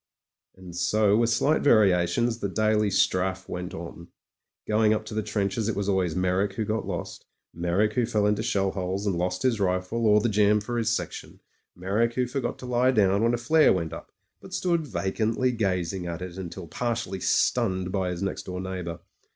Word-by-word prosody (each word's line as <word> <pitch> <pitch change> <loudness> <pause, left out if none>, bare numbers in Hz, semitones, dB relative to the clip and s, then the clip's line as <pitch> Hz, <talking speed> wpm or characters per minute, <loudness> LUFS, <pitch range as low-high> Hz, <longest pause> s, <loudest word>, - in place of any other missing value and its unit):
And 90 -2 -11
so 100 +3 +2
with 115 +1 +2
slight 140 +7 +2
variations 110 0 +3
the 100 - -2
daily 110 +1 +2
strafe 95 -1 +1
went 90 0 -5
on. 85 0 -8 0.6
Going 110 0 +3
up 110 - -4
to 110 - -8
the 110 - 0
trenches 105 +1 -1
it 110 - -1
was 100 -1 -2
always 95 -5 +1
Meyrick 95 +2 0
who 110 +2 -2
got 110 +2 -2
lost; - - -6 0.3
Meyrick 90 +5 0
who 120 -3 +1
fell 105 -3 +1
into 105 0 +1
shell 95 -1 0
holes 95 +1 -3
and 100 -3 0
lost 90 +1 -2
his 125 -4 +1
rifle 95 +4 0
or 105 0 +6
the 105 - +1
jam 105 0 +3
for 120 +3 -3
his 115 -1 0
section; 110 - -4 0.4
Meyrick 105 +6 0
who 125 - +1
forgot 125 -1 -3
to - - -9
lie 125 +1 +2
down 100 -5 +3
when 115 +1 +3
a - - -3
flare 155 +6 +4
went 85 -3 -3
up, - - -9 0.3
but - - -7
stood 170 -4 0
vacantly 110 +5 0
gazing 95 -5 -1
at 85 +1 -5
it 90 -1 -7
until 95 -1 -7
partially 115 -1 -3
stunned 95 -4 +1
by 95 -2 -1
his 90 +1 -4
next 100 - -4
door 90 0 -4
neighbour. 90 -3 -5
100 Hz, 195 wpm, -26 LUFS, 90-115 Hz, 0.6 s, or